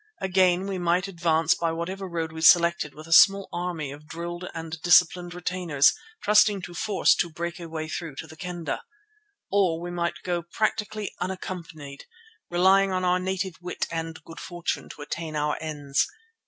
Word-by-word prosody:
Again, 185 -1 +2
we 195 -2 -3
might 175 +2 +1
advance 165 -3 +2
by 165 -1 -1
whatever 185 +4 -4
road 165 -2 -3
we 160 0 -7
selected 170 -2 +5
with 155 +1 -10
a 165 - 0
small 195 +6 +7
army 175 -5 -3
of 150 +2 -12
drilled 175 +3 -6
and 160 -1 -6
disciplined 175 0 +4
retainers, 175 -5 +2 0.3
trusting 210 -2 +4
to 175 - -7
force 205 +3 +3
to 175 - 0
break 170 +2 -5
a 170 -1 -8
way 160 -1 -4
through 160 -2 -5
to 160 - -6
the 160 0 -13
Kendah. 175 -5 -4 0.7
Or 185 -5 +2
we 175 +1 -5
might 170 -1 -1
go 175 -1 -1
practically 215 +3 -2
unaccompanied, 170 -6 -6 0.4
relying 190 +2 +4
on 185 0 0
our 180 0 +3
native 185 -1 -3
wit 180 0 -3
and 165 -1 -5
good 165 - -11
fortune 175 -1 -4
to 145 - -9
attain 160 +1 -5
our 150 0 0
ends. 145 -3 -1
175 Hz, 170 wpm, -26 LUFS, 160-185 Hz, 0.7 s, small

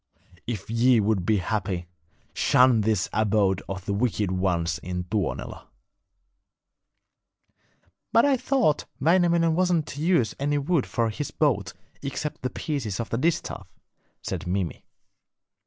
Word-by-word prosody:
If 110 -5 -4
ye 115 +2 +4
would 100 -4 0
be 110 - +3
happy, 95 -3 -2 0.5
shun 125 -3 +4
this 105 -3 +1
abode 100 -3 +2
of 95 -1 -5
the 100 - -1
wicked 105 -3 0
ones 90 -2 0
in 90 0 -4
Tuonela.' 95 +1 -3 2.4
'But 230 - +5
I 280 -1 +4
thought 255 - +1
Wainamoinen 170 +1 +3
wasn't 175 -2 +2
to 145 - -6
use 160 -10 +2
any 145 +1 0
wood 145 0 0
for 115 -1 0
his 150 +6 -4
boat 105 - 0 0.3
except 145 +2 -4
the 130 - -1
pieces 125 -11 -3
of 115 - -4
the 115 - 0
distaff,' 165 +4 -1 0.6
said - - -4
Mimi. 90 -3 -2
115 Hz, 130 wpm, -25 LUFS, 95-150 Hz, 2.4 s, But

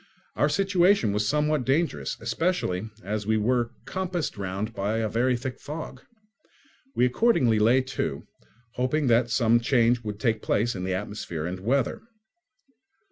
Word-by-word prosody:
Our 145 - +2
situation 185 - +3
was 105 +1 0
somewhat 150 +1 +1
dangerous, 150 +6 0
especially 115 - -1
as 105 0 -3
we 110 0 +2
were 120 +2 +1 0.2
compassed 185 -4 -3
round 100 +3 -4
by 105 +2 -1
a 110 -1 0
very 120 +3 +1
thick 125 +1 -6
fog. 150 +3 -7 0.9
We 125 - +4
accordingly 125 - +3
lay 120 +5 +4
to, 130 +1 -4 0.5
hoping 130 +4 0
that 120 +1 +3
some 115 -1 +3
change 120 -1 +2
would 105 -1 -5
take 110 -2 0
place 115 +3 0
in 90 -1 -4
the 95 0 -1
atmosphere 95 -5 -5
and 90 +2 -4
weather. 120 +6 0
120 Hz, 145 wpm, -26 LUFS, 105-140 Hz, 0.9 s, We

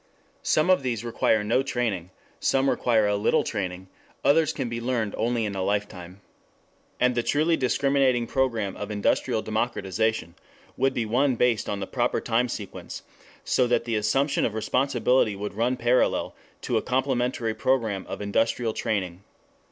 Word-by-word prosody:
] - - -37
Some 155 +4 +2
of 185 - +4
these 120 -4 -2
require 110 -2 +1
no 115 +5 +2
training; 115 -10 -2 0.3
some 135 0 +2
require 115 -3 +2
a 105 0 +1
little 100 +2 +2
training; 95 -3 -4 0.4
others 155 +1 +4
can - - -3
be 115 0 -4
learned 115 -4 -1
only 120 -1 0
in 105 - -3
a 95 - -3
lifetime. 95 -2 -3 0.8
And 125 0 +3
the 120 - +1
truly 155 +7 +2
discriminating 135 -2 +2
program 115 -6 -1
of 105 - -5
industrial 105 +1 0
democratization 110 -4 -1 0.4
would 135 0 +1
be 120 - 0
one 125 +4 +2
based 120 -3 +1
on 100 -1 -3
the - - -2
proper 120 +3 0
time 120 +2 0
sequence, 105 -4 -7 0.4
so 125 - +2
that 120 -1 +1
the 115 -1 -1
assumption 135 +7 +1
of 110 - -1
responsibility 125 -1 +1
would 105 +1 -5
run 120 +4 0
parallel 120 +2 +1 0.3
to - - 0
a - - +1
complementary 125 -3 0
program 110 -7 0
of - - -5
industrial 115 +2 0
training. 95 -5 -3
115 Hz, 160 wpm, -25 LUFS, 105-125 Hz, 0.8 s, of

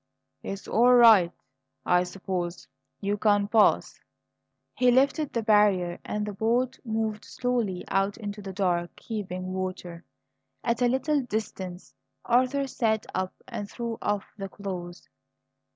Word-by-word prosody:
"It's 195 0 -6
all 245 +3 +5
right, 220 -8 +7 0.5
I 180 0 +4
suppose. 180 -1 -4 0.3
You 200 +1 0
can 205 -1 +3
pass." 215 0 +3 0.7
He 250 - +3
lifted 275 +4 +3
the 230 - -1
barrier 205 -5 +3
and 210 0 -3
the 210 - -5
boat 240 +5 0
moved 220 -2 -2
slowly 235 -7 -2
out 195 +1 0
into 205 -2 -6
the 195 -1 -6
dark, 175 -3 -1
heaving 185 -4 -5
water. 185 -2 -5 0.6
At 235 +1 0
a 245 - +5
little 270 +4 +1
distance 195 -6 -5 0.3
Arthur 255 +3 +2
sat 220 -4 0
up 185 0 -2
and 205 0 -5
threw 235 -2 -5
off 205 -1 -1
the 195 0 -4
clothes. 180 -3 -7
205 Hz, 135 wpm, -27 LUFS, 185-235 Hz, 0.7 s, right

